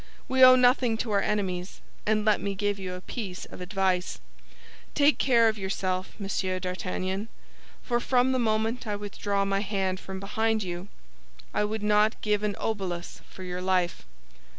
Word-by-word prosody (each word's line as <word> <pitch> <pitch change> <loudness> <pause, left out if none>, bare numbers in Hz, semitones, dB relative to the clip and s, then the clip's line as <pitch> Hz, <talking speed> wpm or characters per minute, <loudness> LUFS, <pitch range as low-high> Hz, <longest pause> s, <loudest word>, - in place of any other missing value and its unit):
We 260 -1 +4
owe 255 0 +10
nothing 250 -2 +4
to 225 0 -3
our 200 -1 +3
enemies; 190 -3 -2 0.3
and 215 0 +2
let 215 -2 +3
me 200 -1 -2
give 205 0 -1
you 185 -1 -4
a 180 - -8
piece 190 -3 -6
of - - -11
advice; 185 -1 0 0.8
take 290 +1 +4
care 235 -4 +5
of 220 -1 0
yourself, 190 -1 -2
Monsieur 195 -2 -2
d'Artagnan, 185 +2 -3 0.6
for 240 -1 0
from 250 +1 +2
the 260 - +1
moment 225 +1 0
I 210 - -1
withdraw 205 -1 -2
my 195 0 +1
hand 195 -2 -1
from 190 0 -7
behind 220 +2 0
you, 175 +1 -5 0.7
I 210 - +2
would 215 0 -3
not 210 +1 +3
give 210 -1 +1
an 210 -1 -1
obolus 185 -6 -3
for 190 - -10
your 180 0 -4
life." 185 -2 0
205 Hz, 170 wpm, -27 LUFS, 185-220 Hz, 0.8 s, owe